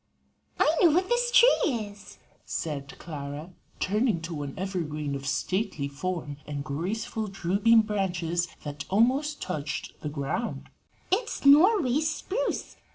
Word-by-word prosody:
"I 310 - +4
know 345 - +7
what 360 +6 +2
this 485 0 +2
tree 485 -6 +6
is," 205 -2 -7 0.3
said 140 -4 -4
Clara, 150 +1 -7 0.3
turning 210 0 +1
to 165 -3 -4
an 140 -1 -5
evergreen 155 -6 -3
of 135 0 -4
stately 150 - -1
form 150 0 -4
and 145 -1 -4
graceful, 195 +9 -3
drooping 200 +4 +3
branches 175 -5 -1 0.2
that 145 -1 -6
almost 265 +9 +2
touched 155 -5 -4
the 150 - -3
ground: 145 +11 -3 0.4
"it's 430 - -1
Norway 300 - +6
spruce. 385 +10 -2
190 Hz, 125 wpm, -27 LUFS, -, 0.4 s, know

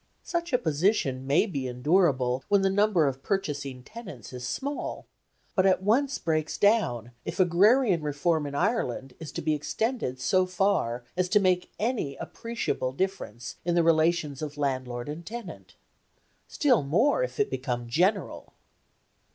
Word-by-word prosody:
Such 340 -1 -3
a 250 - +4
position 150 - 0
may 145 +9 +4
be 140 -11 -3
endurable 130 -1 +2
when 200 -1 +3
the 195 - +3
number 200 -5 +3
of 135 -1 -2
purchasing 145 -10 -3
tenants 155 - -10
is 125 0 -5
small, 280 - -4 0.5
but 190 0 +3
at 190 0 +2
once 260 +7 +2
breaks 155 -2 -1
down 165 - +2
if - - -6
agrarian 190 +2 +4
reform 150 +1 0
in 140 - -6
Ireland 145 - -1
is 160 -2 -7
to - - -4
be 155 0 +2
extended 150 - -2
so 185 +9 +2
far 180 -11 0
as 180 0 0
to 210 +2 +5
make 180 -2 +1
any 215 - -1
appreciable 230 - -3
difference 135 - -4
in 175 0 0
the 170 - +4
relations 160 -3 +2
of 150 -1 -5
landlord 130 -3 -2
and 155 +3 -6
tenant; 230 +7 -9 0.7
still 270 -7 +3
more, 220 - +2
if - - -3
it 420 - +1
become 125 -2 -3
general. 185 - 0
165 Hz, 150 wpm, -27 LUFS, 135-205 Hz, 0.7 s, to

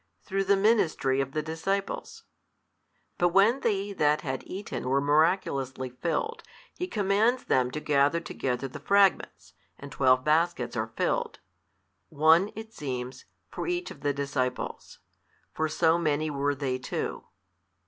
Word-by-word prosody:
through 195 0 -1
the 195 +1 +3
ministry 175 - +2
of 135 -1 -4
the 155 - -1
disciples: 190 +5 -3 1.0
but 175 - +4
when 200 +8 +4
they 205 -4 -1
that 150 -4 +2
had 130 -2 -3
eaten 190 -9 -5
were 135 +1 +3
miraculously 140 -4 +1
filled, 170 - -2 0.3
He 360 - -4
commands 215 - +1
them 125 -1 +2
to 155 - -4
gather 145 +2 +2
together 135 -5 -3
the 135 +3 -9
fragments, 195 +5 +2 0.2
and 140 0 -10
twelve 130 0 +3
baskets 155 -4 +1
are 110 -1 -2
filled, - - -1 0.7
one 160 +6 +4
(it 220 +1 -9
seems) 130 - -5 0.3
for - - -5
each 355 0 -2
of 140 - -12
the 145 0 +1
disciples: 140 -2 -3 0.6
for 160 0 -1
so 160 +2 +2
many 155 -1 0
were 145 0 0
they 130 -2 -2
too. 130 - -4
155 Hz, 140 wpm, -28 LUFS, 135-195 Hz, 1.0 s, but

